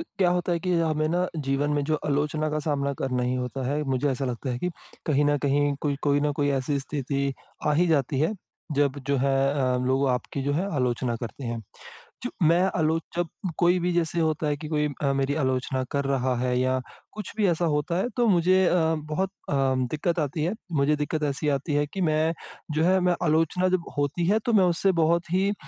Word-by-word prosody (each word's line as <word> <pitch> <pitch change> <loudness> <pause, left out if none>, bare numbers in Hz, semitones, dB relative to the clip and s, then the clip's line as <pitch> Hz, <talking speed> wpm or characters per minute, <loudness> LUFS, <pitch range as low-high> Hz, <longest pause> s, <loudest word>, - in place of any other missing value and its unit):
क्या 195 - 0
होता 180 0 0
है 170 - +1
कि 180 +1 -1
हमें 155 -2 +1
न 180 +2 +1 0.2
जीवन 135 +2 +1
में 145 -1 +1
जो 155 +2 0
आलोचना 150 +1 0
का 155 - -1
सामना 140 -2 0
करना 125 -2 -1
ही 125 +1 0
होता 125 +1 -3
है, 145 +3 0
मुझे 135 +1 0
ऐसा 135 +1 -2
लगता 125 +1 -3
है 120 - -2
कि 180 - -2 0.4
कहीं 145 -1 +3
न 145 0 +3
कहीं, 145 +1 +1
कोई 145 -2 0
कोई 145 -1 +2
न 145 0 +1
कोई 145 -1 +1
ऐसी 140 +2 -1
स्थिति 140 0 -2 0.3
आ 150 - +3
ही 175 +4 +3
जाती 140 -4 +1
है 160 +8 +1 0.4
जब 140 -1 +1
जो 140 0 +2
है 135 +1 +2 0.2
अ, 130 -3 +1
लोग 135 +1 +2
आपकी 125 +2 -2
जो 145 - 0
है 185 +7 -1
आलोचना 125 -1 0
करते 120 +3 -7
हैं। 115 -1 -4 0.6
च - - 0
मैं 165 +3 +5 0.2
आलोच 160 0 +1
जब 175 -1 0 0.3
कोई 175 +1 +4
भी 175 +1 0
जैसे 170 0 +1
होता 155 -1 0
है 145 - 0
कि 150 +1 -7
कोई 150 -1 +1
अ, 140 -1 +2
मेरी 135 +1 0
आलोचना 130 -2 0
कर 140 0 0
रहा 130 -2 +1
है 125 0 +1
या 130 0 +1 0.3
कुछ 215 -2 -7
भी 215 -2 +3
ऐसा 170 0 +1
होता 150 +3 -1
है 195 - 0
तो 240 -1 +3
मुझे 185 0 +4
अ, 175 - +3 0.3
बहुत 190 +5 0 0.2
अ, - - 0
दिक्कत 135 +5 0
आती 150 +1 -1
है। 175 +5 0 0.3
मुझे 150 +2 +3
दिक्कत 150 +1 -2
ऐसी 140 +2 -2
आती 145 +2 -4
है 145 0 +2
कि 195 - -3
मैं 155 +1 +2 0.4
जो 155 +2 +1
है 185 +2 +4
मैं 175 - +3
आलोचना 165 +3 +2
जब 185 -2 0
होती 145 +4 0
है 210 +4 +4
तो 240 - +2
मैं - - +5
उससे 180 +2 +3
बहुत 170 +1 +1
ही 190 +2 +2
अ, - - -1
150 Hz, 225 wpm, -26 LUFS, 135-170 Hz, 0.6 s, मैं